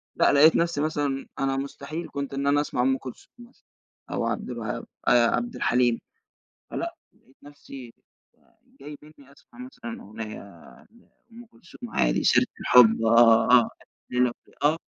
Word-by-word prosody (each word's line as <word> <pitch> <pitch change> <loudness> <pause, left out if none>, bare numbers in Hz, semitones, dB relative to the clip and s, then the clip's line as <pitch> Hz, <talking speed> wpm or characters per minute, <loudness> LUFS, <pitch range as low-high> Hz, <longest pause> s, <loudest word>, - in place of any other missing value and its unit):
لأ، - - +3
لقيت 150 +3 +6
نفسي 170 -3 0
مثلًا 145 -3 -2
أنا 135 0 -1
مستحيل 140 +4 -6
كنت 140 -1 -5
إن 140 +1 -2
أنا 145 +1 +3
أسمع 145 - -3
أم 130 +1 +2
كلثوم 130 -2 -11
مثلًا 240 +1 -18 0.5
أو - - -2
عبد - - -3
الوهاب - - -5 0.2
آآ، 120 -1 +5
عبد 240 0 -4
الحليم، 120 -1 +1 0.7
فلأ - - -4 0.2
لقيت 130 - -29
نفسي 140 -3 -12
ج - - -26 0.9
جاي 145 +2 -9
بإنّي 145 -2 -18
أسمع 145 - -22
مثلًا 240 -2 -9
أغنية 110 +1 -8
عن 100 -5 -17 0.5
أم 235 +1 -13
كلثوم 230 +2 -13
عادي، - - 0
سيرة - - +4
الحب 115 -3 +5
آه، 115 0 +5
آه، 125 - +9
ألف 115 - -4 0.4
ليلة 125 -1 +1
وليل - - -25
آه. 155 +2 +3
140 Hz, 160 wpm, -25 LUFS, 125-155 Hz, 0.9 s, آه